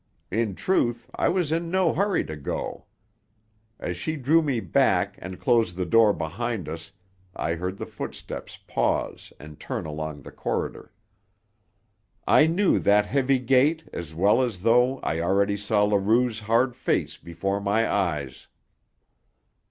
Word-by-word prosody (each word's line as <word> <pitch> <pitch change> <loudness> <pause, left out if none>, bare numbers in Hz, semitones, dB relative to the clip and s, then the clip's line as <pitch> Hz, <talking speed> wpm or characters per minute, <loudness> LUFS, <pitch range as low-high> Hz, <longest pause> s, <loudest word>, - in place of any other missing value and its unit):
In 110 -1 0
truth, 120 - 0
I - - +1
was 175 -5 0
in 165 +1 -1
no 185 -2 +2
hurry 200 +3 +1
to 80 - -6
go. 75 - -5 0.9
As 90 - -3
she 155 - -3
drew 155 +4 +3
me 140 -6 0
back 100 -7 +2
and 95 -1 -8
closed 115 -8 +2
the 90 0 -2
door 110 +4 +5
behind 100 +2 -3
us 80 +4 -7 0.4
I 80 - -1
heard 90 +3 -4
the - - -5
footsteps - - -7
pause - - -1
and 75 0 -12
turn - - -4
along 75 -2 -5
the - - -10
corridor. - - -4 1.3
I 155 - +5
knew 185 +4 +2
that 105 +1 +4
heavy 135 +2 +2
gait 135 +6 +2
as 80 -2 -7
well 100 +8 +4
as 115 -8 -2
though 125 +4 +4
I 80 - -1
already 100 +4 +2
saw 105 +1 +1
Leroux's 110 +3 +2
hard 115 +3 +1
face - - -1
before 95 +4 -3
my 105 +3 +1
eyes. 75 -9 -2
105 Hz, 145 wpm, -25 LUFS, 90-130 Hz, 1.3 s, door